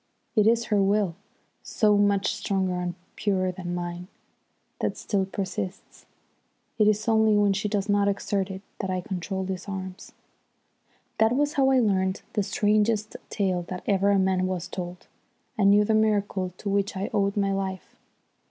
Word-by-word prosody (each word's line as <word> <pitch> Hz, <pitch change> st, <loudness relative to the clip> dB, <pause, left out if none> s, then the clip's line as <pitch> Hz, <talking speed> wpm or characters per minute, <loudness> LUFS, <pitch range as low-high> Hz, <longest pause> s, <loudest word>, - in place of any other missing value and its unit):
It 215 Hz, -1 st, +4 dB
is 235 Hz, +1 st, +4 dB
her 205 Hz, -, +4 dB
will, 195 Hz, -3 st, +1 dB, 0.5 s
so 210 Hz, -2 st, +2 dB
much 205 Hz, -1 st, +2 dB
stronger 195 Hz, -3 st, -1 dB
and 175 Hz, -1 st, -3 dB, 0.2 s
purer 185 Hz, -3 st, 0 dB
than 175 Hz, -1 st, -5 dB
mine, 175 Hz, 0 st, -5 dB, 0.7 s
that -, -, -1 dB
still 195 Hz, -3 st, -1 dB
persists. 190 Hz, -1 st, -5 dB, 0.7 s
It 210 Hz, -, +5 dB
is 215 Hz, +1 st, +1 dB
only 220 Hz, -1 st, +4 dB
when 205 Hz, -1 st, +3 dB
she 210 Hz, +2 st, -2 dB
does 200 Hz, -1 st, -1 dB
not 205 Hz, -1 st, +2 dB
exert 200 Hz, -1 st, -1 dB
it 190 Hz, 0 st, -7 dB, 0.2 s
that 190 Hz, -, -3 dB
I 185 Hz, -1 st, -1 dB
control 190 Hz, +1 st, -4 dB
these 185 Hz, 0 st, -5 dB
arms." 190 Hz, -1 st, -7 dB, 1.1 s
That 220 Hz, +2 st, +4 dB
was 290 Hz, +2 st, +1 dB
how 270 Hz, -1 st, +3 dB
I 265 Hz, -, +4 dB
learnt 190 Hz, -4 st, +1 dB
the 210 Hz, -, +1 dB
strangest 210 Hz, +1 st, +1 dB
tale 190 Hz, -4 st, 0 dB
that 180 Hz, -1 st, -6 dB
ever 200 Hz, 0 st, +2 dB
a 200 Hz, -, +4 dB
man 190 Hz, -1 st, +2 dB
was 180 Hz, -2 st, -3 dB
told, 180 Hz, -1 st, -7 dB, 0.5 s
and 200 Hz, -4 st, +4 dB
knew 205 Hz, +1 st, +6 dB
the 220 Hz, -, +1 dB
miracle 205 Hz, -4 st, +1 dB
to -, -, -8 dB
which 200 Hz, 0 st, 0 dB
I 195 Hz, -, -3 dB
owed 200 Hz, 0 st, +1 dB
my 195 Hz, -1 st, +1 dB
life. 190 Hz, -1 st, -4 dB
200 Hz, 170 wpm, -26 LUFS, 185-210 Hz, 1.1 s, knew